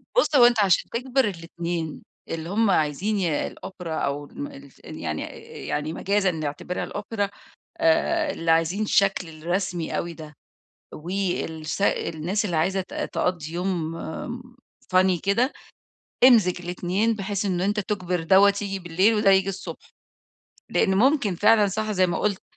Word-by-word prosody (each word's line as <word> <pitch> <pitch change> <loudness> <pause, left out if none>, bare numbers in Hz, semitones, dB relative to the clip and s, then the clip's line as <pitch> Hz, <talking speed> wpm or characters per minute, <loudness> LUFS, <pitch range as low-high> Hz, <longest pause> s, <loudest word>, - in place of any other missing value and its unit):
بُص، 485 -11 +3
هو 250 -3 +8
أنت 240 -1 +4
عشان 195 -4 +3
تجبِر 255 +2 0
الإتنين، 170 -3 -4 0.3
اللي 165 0 -4
هُم 215 +2 +2
عايزين 180 +6 +1
ي 165 -6 0
الأوبرا 180 -4 -7
أو 145 -1 -2
الم 285 - -7
الف 280 -1 -14
يعني - - -4
آآ، - - -8
آآ، 460 +1 -12
يعني 150 +2 -2
مجازًا 195 +1 +1
نعتبرها 155 +2 -4
الأوبرا 205 -1 -3 0.5
آآ، 325 -1 +2
اللي 165 -8 0
عايزين 165 +5 +2
الشكل 195 -4 +2
الرسمي 175 +2 -2
أوي 170 0 -3
ده 155 -2 -11 0.6
والس 175 -1 -3
الناس 180 +2 0
اللي 175 -5 -1
عايزة 190 +5 +1
ت 185 - -9
تقضّي 165 -3 -2
يوم، 175 -2 -2
آمم 245 +9 -7 0.4
funny 185 -2 +4
كده 230 +8 +2 0.7
إمزِج 215 -9 +6
الإتنين، 180 +5 0
بحيث 205 -1 -3
إن 180 -3 0
أنت 205 +3 +1
تجبِر 185 -4 -2
دَوّة 195 +4 +6
ييجي 195 -1 -3
بالليل 185 +5 +2
وده 210 -2 +4
ييجي 190 0 +3
الصبح، 190 -1 -8 0.8
لإن 190 - +2
ممكن 245 -1 +3
فعلًا 210 +3 +5
صح 215 +2 -2
زي 185 -2 +3
ما 175 - -1
قُلت 205 -3 -1
190 Hz, 150 wpm, -24 LUFS, 170-210 Hz, 0.8 s, هو